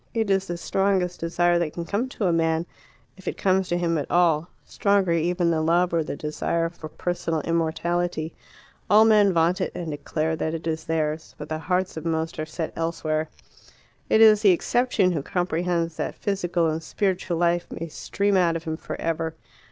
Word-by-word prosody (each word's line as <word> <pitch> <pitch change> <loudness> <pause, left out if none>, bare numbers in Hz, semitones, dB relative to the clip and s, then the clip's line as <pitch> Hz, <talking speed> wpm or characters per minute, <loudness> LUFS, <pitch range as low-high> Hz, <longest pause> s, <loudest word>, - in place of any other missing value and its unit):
It 220 -3 +1
is 195 0 +1
the 175 - -3
strongest 190 0 0
desire 175 +1 +2
that 165 -3 -2
can 170 - -5
come 220 +8 -1
to 220 - -3
a 175 - +3
man 165 0 +1 0.5
if 190 - -15
it - - -2
comes 190 -1 +2
to 175 - +1
him 165 -2 0
at 145 - -5
all 170 -1 +3 0.2
stronger 200 -3 +1
even 170 +1 +1
than 160 -1 0
love 175 +1 +3
or 165 -1 +2
the 150 - -5
desire 165 +3 -1
for 165 -2 -10
personal 165 -2 -2
immortality. 165 0 -1 0.6
All 215 +2 +7
men 210 -3 +5
vaunt 170 +1 +2
it, - - -1
and 170 -3 -4
declare 155 +2 -2
that 160 0 -2
it 165 - -7
is 160 -1 -2
theirs; 155 -1 -2
but 150 - -8
the 155 0 -2
hearts 180 +2 -1
of 160 - -5
most 160 0 -2
are 155 - -3
set 160 +1 -4
elsewhere. 160 -1 -2 0.8
It 220 - +4
is 215 -2 +7
the 210 - +6
exception 205 +1 +2
who 160 -5 -1
comprehends 170 0 -1
that - - -3
physical 175 -4 -1
and 160 0 -1
spiritual 185 0 -1
life 175 0 +1
may 165 - -5
stream 200 +5 -1
out 175 -3 +3
of 165 - -4
him 160 -2 -3
for - - -7
ever. 165 0 -2
170 Hz, 195 wpm, -24 LUFS, 160-180 Hz, 0.8 s, All